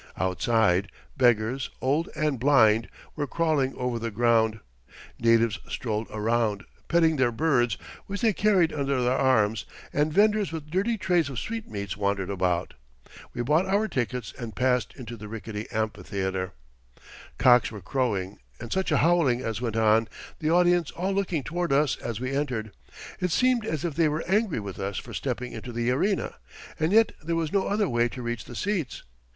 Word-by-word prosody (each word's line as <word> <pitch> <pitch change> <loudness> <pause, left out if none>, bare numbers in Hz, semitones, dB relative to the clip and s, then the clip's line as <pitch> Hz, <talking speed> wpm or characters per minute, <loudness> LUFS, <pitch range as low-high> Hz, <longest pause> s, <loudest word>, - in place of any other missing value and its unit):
Outside, 95 +1 +1 0.2
beggars, 120 0 +2
old 145 +6 0
and 150 -4 0
blind, 115 -5 +4 0.3
were 145 -2 -2
crawling 155 -4 0
over 125 -2 -2
the 115 0 -3
ground; 110 0 +2 0.6
natives 115 -1 +3
strolled 110 -2 -3
around, 110 -1 0 0.2
petting 165 -2 +3
their 130 -2 +3
birds, 120 -4 +1 0.3
which 200 +2 -4
they 225 -3 +3
carried 190 -5 +3
under 140 -2 0
their 125 +1 +2
arms; 115 -5 +2 0.3
and 150 +2 +1
vendors 210 +2 +3
with 155 -2 -7
dirty 205 +6 +1
trays 175 -6 +1
of 135 - -6
sweetmeats 110 - -4
wandered 100 -1 -1
about. 90 -3 0 0.6
We 120 - -1
bought 155 +8 +2
our 200 +3 +2
tickets 125 - -3
and 115 -3 -6
passed 125 -3 +1
into 120 -3 -8
the 105 0 -9
rickety 105 0 -6
amphitheater. 100 -3 -3 0.8
Cocks 125 -1 +5
were 105 - -7
crowing, 100 -2 -2 0.2
and 120 -1 -5
such 190 -3 0
a 150 - +4
howling 160 -8 +3
as 115 -3 -3
went 115 -3 -2
on, 110 0 +4 0.3
the 155 - 0
audience 175 -1 +3
all 190 +3 -2
looking 185 -7 -1
toward 175 +1 -2
us 140 -1 +3
as 115 -2 -5
we 130 +1 -3
entered. 125 -7 -2 0.5
It 180 - 0
seemed 245 +4 +2
as 155 -3 -2
if 165 - -2
they 160 +1 +2
were 155 +2 -2
angry 195 - +1
with 100 -2 -7
us 100 0 -3
for - - -7
stepping 125 -2 -3
into 115 +2 -7
the 120 +1 0
arena, 190 +10 0 0.4
and 160 +2 +1
yet 225 +2 +5
there 165 +2 -2
was 165 0 -2
no 200 -1 +2
other 205 0 +1
way 120 -1 +1
to 125 +1 -7
reach 120 -2 -4
the 120 - -10
seats. 180 - -2
125 Hz, 175 wpm, -26 LUFS, 110-165 Hz, 0.8 s, Cocks